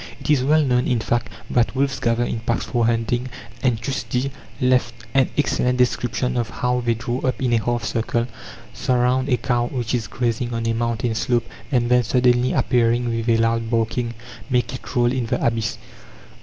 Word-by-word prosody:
It - - -1
is 135 -4 +3
well 155 +3 +4
known, 125 -2 +2
in 125 -2 +1
fact, 120 +2 -1 0.2
that 120 +1 +2
wolves 135 0 0
gather 120 -2 +1
in 115 - -2
packs 115 +1 -1
for 120 -3 +1
hunting, 120 +2 0 0.3
and 125 -4 +2
Tschudi 125 +1 -2 0.3
left 125 -2 +2 0.2
an 135 -2 +3
excellent 125 -3 +1
description 125 0 0
of 120 -2 -1
how 125 0 -1
they 115 -1 +1
draw 120 +2 -3
up 130 -1 -1
in 125 -3 +1
a 115 -2 +2
half 120 -1 -1
circle, 115 +1 -1 0.5
surround 130 +1 +1
a 125 - +3
cow 120 +1 0
which 120 -3 -3
is 115 -3 -1
grazing 120 +1 -2
on 115 0 -2
a 115 - +1
mountain 115 0 -1
slope, 120 +1 0 0.3
and 120 -3 +2
then, 125 0 +6
suddenly 125 +1 +2
appearing 120 0 +2
with 115 +1 -2
a 115 - +4
loud 115 0 +1
barking, 115 +1 -1 0.3
make 125 -1 +1
it 130 - -8
roll 120 -1 +3
in 125 -3 -1
the - - 0
abyss. 115 -2 0
120 Hz, 190 wpm, -22 LUFS, 115-125 Hz, 0.5 s, then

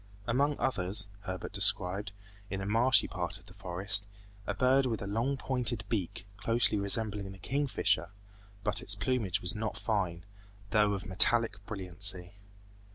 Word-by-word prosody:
Among 140 +5 +1
others, 100 -3 -1 0.2
Herbert 95 +1 -5
described, 100 0 +2 0.4
in 95 - -4
a 95 - -4
marshy 115 +5 +4
part - - -3
of - - -17
the - - -15
forest, 95 +3 0 0.4
a - - -2
bird 130 +1 +3
with 115 -5 -3
a - - -5
long 115 +7 -1
pointed 125 -4 -2
beak, 95 -3 -3
closely 115 +1 +2
resembling 100 -1 +1
the 95 - -11
king 140 +10 -2
fisher, 95 -6 0 0.5
but 105 +1 0
its 100 -5 0
plumage 110 -3 -1
was 90 +1 +4
not 110 0 -3
fine, 90 -6 -2 0.5
though 105 -2 +3
of 95 -2 -4
a - - -10
metallic 110 +2 +4
brilliancy. 95 -2 +1
105 Hz, 160 wpm, -31 LUFS, 95-115 Hz, 0.5 s, marshy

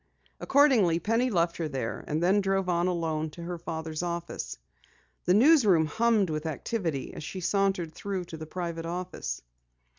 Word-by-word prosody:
Accordingly, 255 - +4
Penny 230 +8 +1
left 170 -5 +1
her 165 - -2
there, 130 -6 -4
and 155 +3 -1
then 195 +3 +4
drove 195 -1 0
on 175 0 +1
alone 160 -3 -1
to 170 +3 -10
her 175 0 -5
father's 160 -1 -4
office. 170 - -4 0.7
The 180 - +4
news 285 +6 +6
room 175 -6 +4
hummed 215 +2 +2
with 155 +1 -2
activity 160 - -3
as - - -7
she 185 - -5
sauntered 190 -3 0
through 195 -1 -4
to 165 - -8
the 155 0 -8
private 170 -1 -4
office. 175 - -4
175 Hz, 170 wpm, -28 LUFS, 160-195 Hz, 0.7 s, news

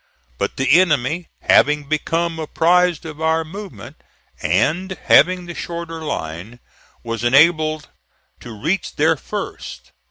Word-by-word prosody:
But - - -2
the 145 +6 +5
enemy 160 0 0
having 150 0 +3
become 165 +3 -2
apprised 175 +2 +1
of 155 -1 -8
our 160 0 +1
movement, 160 - -10 0.4
and 165 - 0
having 180 0 +4
the 175 - -7
shorter 170 -1 -6
line, 105 - -6 0.4
was 115 -1 -4
enabled 155 +4 +3 0.5
to 120 - -10
reach 155 - -3
there 160 +2 +3
first. - - -7
160 Hz, 120 wpm, -19 LUFS, 140-170 Hz, 0.5 s, the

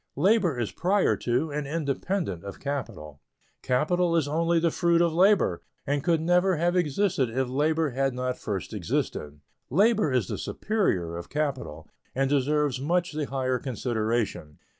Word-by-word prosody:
Labor 185 - +3
is 115 - -2
prior 195 +3 +2
to 125 +6 -1
and 145 -1 -3
independent 150 - -2
of 100 -1 -8
capital. 95 - -5 0.4
Capital 170 +7 +1
is 160 -4 +2
only 165 +3 +1
the 165 0 +2
fruit 170 +1 +2
of 170 -1 +2
labor, 185 - +3 0.2
and 140 0 -1
could 170 -2 +2
never 180 +3 +3
have 175 +3 +1
existed 170 - +1
if 130 +3 -1
labor 155 +3 +1
had 135 0 0
not 125 0 -2
first 100 -4 -4
existed. 75 0 -3 0.3
Labor 205 - +3
is 125 -7 +1
the - - -4
superior 95 - -1
of 85 - -8
capital, 130 - -3 0.3
and 135 +1 +1
deserves 145 -1 +1
much 175 +4 0
the 155 -1 -2
higher 130 -2 -1
consideration. 115 - -2
145 Hz, 155 wpm, -26 LUFS, 125-170 Hz, 0.4 s, Labor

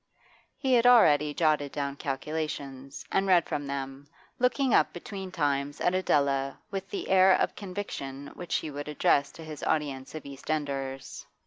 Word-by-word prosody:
He 265 -2 +1
had 245 0 +5
already 150 -12 +6
jotted 150 -2 +1
down 140 -1 -2
calculations, 140 -1 -4
and 195 0 +2
read 180 -3 +5
from 145 -1 -3
them, 135 0 -5 0.3
looking 250 +1 +2
up - - +4
between 190 +1 -7
times 145 -3 -1
at 180 - +2
Adela 140 -6 +1
with 195 -1 -4
the - - -4
air 190 0 +6
of - - 0
conviction 145 -9 -6
which 175 - -4
he 155 - -2
would 145 +1 -6
address 140 -1 +2
to 165 - -10
his 155 -2 -8
audience 140 -3 -2
of 155 - -7
East 140 -1 -10
Enders. 135 -3 -3
150 Hz, 160 wpm, -28 LUFS, 140-185 Hz, 0.3 s, already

